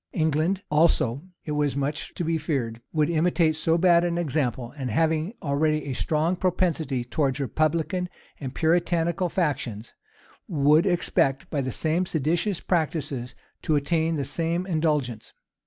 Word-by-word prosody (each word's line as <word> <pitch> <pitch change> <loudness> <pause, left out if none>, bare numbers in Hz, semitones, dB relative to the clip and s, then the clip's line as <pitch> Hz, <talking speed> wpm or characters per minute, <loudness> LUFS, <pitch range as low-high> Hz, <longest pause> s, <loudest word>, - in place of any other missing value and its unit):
England 160 +4 +1
also, 150 -5 +3 0.2
it 150 - -4
was 150 -2 0
much 140 +2 -2
to 175 - -2
be 165 +1 +1
feared, 125 -7 -2
would 155 -2 +2
imitate 165 -1 +2
so 160 +1 +1
bad 170 -1 +5
an 170 -1 0
example; 135 -6 -1
and 135 -4 -4
having 160 - +1
already 155 +1 +1
a 140 - -3
strong 160 +6 0
propensity 165 -8 0
towards 135 +2 -1
republican 160 +6 0 0.3
and 135 -2 -6
Puritanical 170 +1 +1
factions, 130 - -2 0.5
would 150 +2 +4
expect, 155 -6 +1
by 145 - 0
the 130 -1 -2
same 165 +7 0
seditious 165 +6 0
practices, 150 -7 -2 0.3
to 155 - +1
attain 160 +3 +1
the 140 -3 -2
same 165 +5 -1
indulgence. 150 - -1
155 Hz, 140 wpm, -25 LUFS, 140-170 Hz, 0.5 s, bad